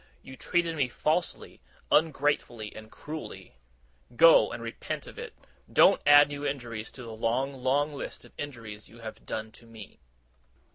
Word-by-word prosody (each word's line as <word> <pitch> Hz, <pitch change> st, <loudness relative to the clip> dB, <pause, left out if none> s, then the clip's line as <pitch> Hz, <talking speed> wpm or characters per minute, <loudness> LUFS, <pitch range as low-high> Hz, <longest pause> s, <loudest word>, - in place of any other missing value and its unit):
You 130 Hz, -, -10 dB
treated 170 Hz, +2 st, 0 dB
me 140 Hz, -4 st, +1 dB
falsely, 155 Hz, -, -1 dB, 0.3 s
ungratefully, 145 Hz, -8 st, +1 dB
and 110 Hz, 0 st, -11 dB
cruelly. 155 Hz, -, -9 dB, 0.6 s
Go, 165 Hz, +7 st, +7 dB
and 120 Hz, -, -6 dB
repent 115 Hz, -, -5 dB
of -, -, -11 dB
it. -, -, -8 dB, 0.4 s
Don't -, -, +6 dB
add 145 Hz, 0 st, +9 dB
new 145 Hz, 0 st, -6 dB
injuries 120 Hz, -6 st, -4 dB
to 125 Hz, -, -10 dB
the 115 Hz, -1 st, -8 dB
long, 125 Hz, +5 st, 0 dB
long 135 Hz, +3 st, 0 dB
list 140 Hz, -, -7 dB
of -, -, -18 dB
injuries 115 Hz, -7 st, -8 dB
you 115 Hz, +1 st, -15 dB
have 110 Hz, -1 st, -9 dB
done 110 Hz, 0 st, -4 dB
me! 115 Hz, -3 st, -13 dB
130 Hz, 150 wpm, -28 LUFS, 115-145 Hz, 0.6 s, add